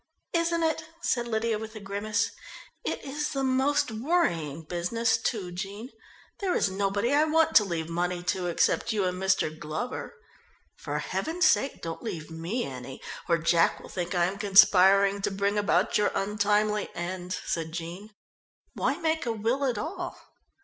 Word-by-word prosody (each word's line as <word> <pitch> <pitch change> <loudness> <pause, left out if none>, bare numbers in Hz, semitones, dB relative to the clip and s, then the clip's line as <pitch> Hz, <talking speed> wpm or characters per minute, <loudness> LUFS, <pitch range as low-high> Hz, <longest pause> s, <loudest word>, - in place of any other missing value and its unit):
"Isn't 335 0 +1
it," 320 0 0 0.2
said 240 -1 0
Lydia 220 -1 0
with 220 0 -8
a - - -6
grimace. 205 +2 -1 0.5
"It - - -3
is 295 +2 -2
the 275 -1 -1
most 265 0 +2
worrying 215 - 0
business, 180 +8 0
too, 220 -5 -2
Jean. 200 +7 -6 0.5
There 385 -3 0
is 195 - +2
nobody 200 +5 0
I 300 +2 +5
want 320 +1 +2
to 210 - +6
leave 170 -5 -3
money 175 +1 -2
to 180 +1 -1
except 175 - +1
you 205 -3 +1
and 180 0 -2
Mr. 190 -5 +1
Glover." 160 - -5 0.6
"For - - -4
heaven's 355 +3 -1
sake 275 - +2
don't 165 -1 -5
leave 165 -9 -6
me 170 +10 -3
any 130 0 -8 0.3
or 170 - +4
Jack 165 0 +3
will - - -12
think 180 0 -3
I 175 -1 +3
am 195 +3 -3
conspiring 195 0 +6
to - - +1
bring 200 +1 0
about 205 0 +2
your 210 - +2
untimely 210 +1 +1
end," 180 +1 -4
said 165 -1 -2
Jean. 175 +5 -6 0.6
"Why 280 - 0
make 320 -5 -1
a - - +1
will 230 +5 0
at 250 -5 0
all?" 315 - -4
205 Hz, 165 wpm, -28 LUFS, 175-245 Hz, 0.6 s, to